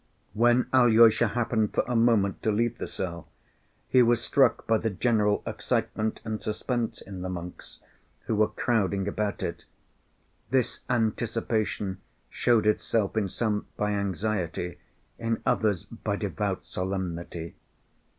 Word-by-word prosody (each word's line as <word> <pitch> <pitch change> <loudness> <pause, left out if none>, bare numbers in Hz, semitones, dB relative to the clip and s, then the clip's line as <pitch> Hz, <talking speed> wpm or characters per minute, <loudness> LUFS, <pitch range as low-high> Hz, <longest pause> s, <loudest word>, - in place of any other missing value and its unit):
When 120 +3 +4
Alyosha 115 -2 +6
happened 115 -1 0
for - - +3
a 125 - -1
moment 115 -4 +3
to 110 - +1
leave 115 +3 0
the - - -3
cell, 85 -3 -5 0.6
he 130 - +5
was 120 -1 +4
struck 135 +3 +2
by 115 -1 +2
the 115 - 0
general 105 0 +1
excitement 110 0 -2
and 110 -1 -3
suspense 115 +2 -2
in 95 -2 -8
the 95 - -3
monks 90 -1 -8 0.4
who 110 - -2
were 105 0 +4
crowding 100 -4 0
about 105 0 -2
it. - - -4 0.8
This 130 -2 +1
anticipation 110 -4 -1 0.3
showed 120 -3 +2
itself 105 -1 +1
in 105 -3 0
some 105 0 -1
by 105 0 0
anxiety, 95 -3 -2 0.4
in 115 -1 -1
others 105 -6 +1
by - - -4
devout - - -3
solemnity. 85 -3 -4
110 Hz, 130 wpm, -27 LUFS, 100-115 Hz, 0.8 s, Alyosha